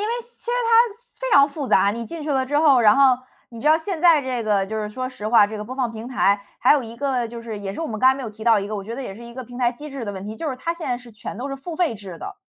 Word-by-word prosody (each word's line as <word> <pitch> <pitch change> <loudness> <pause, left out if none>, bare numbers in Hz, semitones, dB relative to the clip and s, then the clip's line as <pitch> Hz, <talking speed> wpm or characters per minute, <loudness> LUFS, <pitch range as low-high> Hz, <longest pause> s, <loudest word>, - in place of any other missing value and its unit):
为 420 - -1
其 475 +1 -16
实 - - -1
它 460 -1 +4 0.3
非 - - -2
常 280 0 +8
复 285 -2 -6
杂， 200 - +4
你 230 +3 -4
进 335 -2 -7
去 300 - -3
了 265 -2 +1
之 290 +2 +1
后， 290 -5 +5
然 215 0 +6
后 265 -2 +5 0.3
你 230 -1 -10
知 290 - -4
道 310 +1 +6
现 330 +1 -4
在 330 -4 +6
这 255 -2 -2
个 205 -3 +1
就 205 +3 -6
是 210 -1 -3
说 255 +4 -4
实 250 -5 -5
话， 220 -2 +6
这 215 +1 -7
个 210 - -4
播 255 +4 -8
放 250 -4 -1
平 225 +2 -7
台， 200 -5 +2 0.2
还 250 - +5
有 290 -2 +2
一 230 0 -9
个 255 -3 -1
就 235 0 -8
是 225 -2 -6
也 195 -1 -5
是 - - -6
我 - - -2
们 215 -5 -5
刚 255 - +6
才 265 - +5
没 270 - -6
有 230 - -5
提 215 +1 -13
到 225 -1 +5
一 200 - -3
个， 215 - -5
我 200 - -4
觉 225 +4 -6
得 270 - -5
也 195 - -6
是 230 - -12
一 235 0 -11
个 260 0 -6
平 245 +1 -10
台 240 -2 +2
机 290 +5 -10
制 275 -2 -6
的 205 - -3
问 190 0 -7
题， 210 +1 -6
就 310 +8 -4
是 260 - -3
它 330 +6 -2
现 335 -3 -6
在 245 - 0
是 240 -2 -14
全 210 - -8
都 260 +5 -5
是 - - -3
付 320 +4 -7
费 340 -8 +1
制 195 -4 -9
的。 - - -8
250 Hz, 380 characters per minute, -22 LUFS, 220-285 Hz, 0.3 s, 常